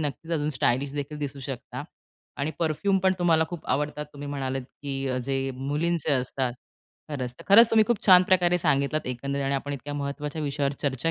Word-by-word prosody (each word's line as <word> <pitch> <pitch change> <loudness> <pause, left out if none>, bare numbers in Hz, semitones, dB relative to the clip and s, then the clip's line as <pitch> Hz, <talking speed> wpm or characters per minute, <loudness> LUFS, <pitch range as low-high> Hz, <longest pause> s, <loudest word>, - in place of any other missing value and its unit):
नक्कीच 155 +3 -4
अजून 150 -2 0
स्टायलिशदेखील 140 +4 -1
दिसू 140 -1 -4
शकता. 130 +1 -6 0.6
आणि 150 - 0
परफ्यूम 175 +5 +1
पण 190 0 +4
तुम्हाला 165 -2 +4
खूप 175 -3 -7
आवडतात. 150 +1 -2
तुम्ही 145 0 -7
म्हणालात, 135 -2 -2 0.2
की 140 -1 -3
अ, 130 0 0
जे 135 +2 -2 0.2
मुलींचे 150 +4 -1
असतात. 130 -1 0 0.6
खरंच, 125 -4 -4
खरंच 225 +4 +8
तुम्ही 220 -1 +5
खूप 235 -1 -1
छान 185 -1 +9
प्रकारे 180 -1 +4
सांगितलात 140 0 +1
एकंदरीत 140 +3 -2
आणि 135 +1 0
आपण 145 +1 -2
इतक्या 145 +1 -5
महत्त्वाच्या 145 +2 -4
विषयावर 140 -1 -1
चर्चा 135 +3 0
145 Hz, 175 wpm, -26 LUFS, 135-160 Hz, 0.6 s, छान